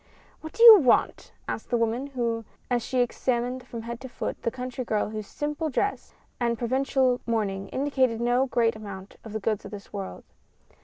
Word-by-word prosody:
"What 315 Hz, -, -9 dB
do 460 Hz, -, +2 dB
you 450 Hz, -3 st, +12 dB
want?" 255 Hz, -7 st, +2 dB, 0.2 s
asked -, -, -5 dB
the 240 Hz, -, +2 dB
woman, 235 Hz, 0 st, -1 dB, 0.3 s
as 245 Hz, -1 st, +2 dB
she 250 Hz, +2 st, 0 dB
examined 245 Hz, +1 st, -1 dB
from 230 Hz, -3 st, -7 dB
head 235 Hz, +1 st, -6 dB
to 260 Hz, -, -8 dB
foot, -, -, -5 dB
the -, -, 0 dB
country 255 Hz, +1 st, -5 dB
girl 215 Hz, -3 st, -1 dB
whose 215 Hz, -2 st, -5 dB
simple 300 Hz, +2 st, -3 dB
dress 405 Hz, +9 st, -2 dB, 0.2 s
and 235 Hz, -1 st, 0 dB
provincial 255 Hz, +1 st, +1 dB
mourning 200 Hz, -4 st, -1 dB
indicated 260 Hz, -4 st, +1 dB
no 245 Hz, +3 st, +2 dB
great 235 Hz, -3 st, +1 dB
amount 200 Hz, -3 st, -9 dB
of 220 Hz, -, -9 dB
the 220 Hz, -, -3 dB
goods 215 Hz, 0 st, -1 dB
of -, -, -8 dB
this 205 Hz, -1 st, -10 dB
world. 195 Hz, -2 st, -6 dB
240 Hz, 185 wpm, -26 LUFS, 225-260 Hz, 0.3 s, you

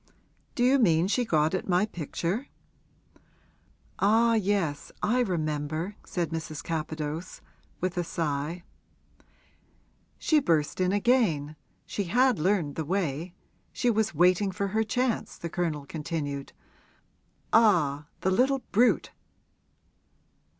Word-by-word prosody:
'Do 245 Hz, -, +1 dB
you 265 Hz, +2 st, +5 dB
mean 170 Hz, -7 st, +4 dB
she 210 Hz, +5 st, +1 dB
got 155 Hz, -7 st, +1 dB
at 185 Hz, -, -2 dB
my 180 Hz, +3 st, +3 dB
picture?' 180 Hz, -, -3 dB, 1.5 s
'Ah 225 Hz, +3 st, +4 dB
yes, 195 Hz, -8 st, 0 dB
I 240 Hz, +4 st, +2 dB
remember,' 160 Hz, -2 st, -2 dB
said 170 Hz, -3 st, -2 dB
Mrs. 160 Hz, -2 st, -5 dB
Capadose, 155 Hz, +1 st, -4 dB, 0.4 s
with 180 Hz, 0 st, -1 dB
a -, -, +1 dB
sigh. 165 Hz, 0 st, -3 dB, 1.5 s
'She 310 Hz, -, +3 dB
burst 165 Hz, -, +1 dB
in 185 Hz, 0 st, +2 dB
again 200 Hz, -, +2 dB, 0.3 s
she 200 Hz, -, -3 dB
had 245 Hz, +4 st, +3 dB
learned 170 Hz, -4 st, 0 dB
the 160 Hz, -, -1 dB
way 170 Hz, -1 st, -2 dB, 0.4 s
she 245 Hz, -, +1 dB
was 220 Hz, -4 st, 0 dB
waiting 180 Hz, +4 st, +4 dB
for 200 Hz, +1 st, -2 dB
her 220 Hz, +3 st, +1 dB
chance,' 245 Hz, +2 st, -1 dB
the 170 Hz, -, -6 dB
Colonel 160 Hz, -5 st, -2 dB
continued. 145 Hz, -2 st, -4 dB, 1.0 s
'Ah, 160 Hz, -10 st, +4 dB
the 190 Hz, -, +1 dB
little 260 Hz, +6 st, +2 dB
brute!' 240 Hz, +5 st, +3 dB
180 Hz, 115 wpm, -28 LUFS, 155-215 Hz, 1.5 s, you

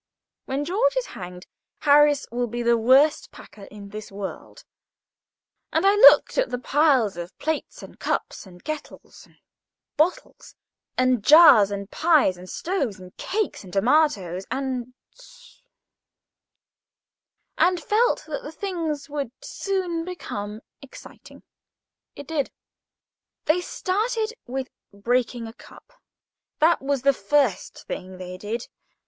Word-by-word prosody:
When 275 Hz, +2 st, -2 dB
George 465 Hz, +9 st, +1 dB
is -, -, 0 dB
hanged, 180 Hz, -1 st, -9 dB, 0.4 s
Harris 290 Hz, 0 st, +4 dB
will 245 Hz, +1 st, -1 dB
be 240 Hz, +1 st, -4 dB
the 235 Hz, 0 st, +4 dB
worst 265 Hz, +7 st, +3 dB
packer 200 Hz, -, -14 dB
in 200 Hz, -1 st, -12 dB
this 215 Hz, 0 st, -9 dB
world; 195 Hz, -1 st, -8 dB, 1.1 s
and -, -, +1 dB
I 395 Hz, -, +6 dB
looked 295 Hz, 0 st, +7 dB
at -, -, +1 dB
the 250 Hz, -, -2 dB
piles 260 Hz, -, +2 dB
of 175 Hz, +1 st, -8 dB
plates 315 Hz, 0 st, -4 dB
and -, -, -13 dB
cups, -, -, -3 dB
and 180 Hz, -1 st, -16 dB
kettles, 310 Hz, -1 st, -8 dB
and -, -, -26 dB, 0.6 s
bottles 365 Hz, +11 st, -1 dB, 0.4 s
and 255 Hz, -4 st, +2 dB
jars, 285 Hz, -9 st, +8 dB
and 200 Hz, 0 st, -6 dB
pies, 310 Hz, -, +3 dB
and 180 Hz, +1 st, -12 dB
stoves, 280 Hz, -, -3 dB
and 180 Hz, -1 st, -13 dB
cakes, 415 Hz, -, -3 dB
and 185 Hz, -, -12 dB
tomatoes, 195 Hz, -, +1 dB
&c., 270 Hz, -, -7 dB, 2.0 s
and 360 Hz, 0 st, +3 dB
felt 465 Hz, +4 st, +1 dB
that 310 Hz, -2 st, -5 dB
the 295 Hz, -, -8 dB
thing 335 Hz, -3 st, -3 dB, 0.2 s
would 285 Hz, -5 st, -3 dB
soon 365 Hz, -4 st, -3 dB
become 215 Hz, -, -6 dB, 0.2 s
exciting. 275 Hz, -, -14 dB, 0.7 s
It 285 Hz, -, -9 dB
did. 295 Hz, -2 st, -2 dB, 1.0 s
They 335 Hz, +4 st, +2 dB
started 435 Hz, +5 st, -2 dB
with 260 Hz, +1 st, -4 dB, 0.2 s
breaking 235 Hz, +3 st, -1 dB
a 225 Hz, -, -9 dB
cup. -, -, -17 dB, 0.6 s
That 330 Hz, +2 st, +3 dB
was 275 Hz, -1 st, -1 dB
the 275 Hz, 0 st, +4 dB
first 245 Hz, -1 st, 0 dB
thing 185 Hz, 0 st, -7 dB
they 185 Hz, 0 st, -8 dB
did. 225 Hz, +4 st, -5 dB
270 Hz, 130 wpm, -24 LUFS, 210-330 Hz, 2.0 s, jars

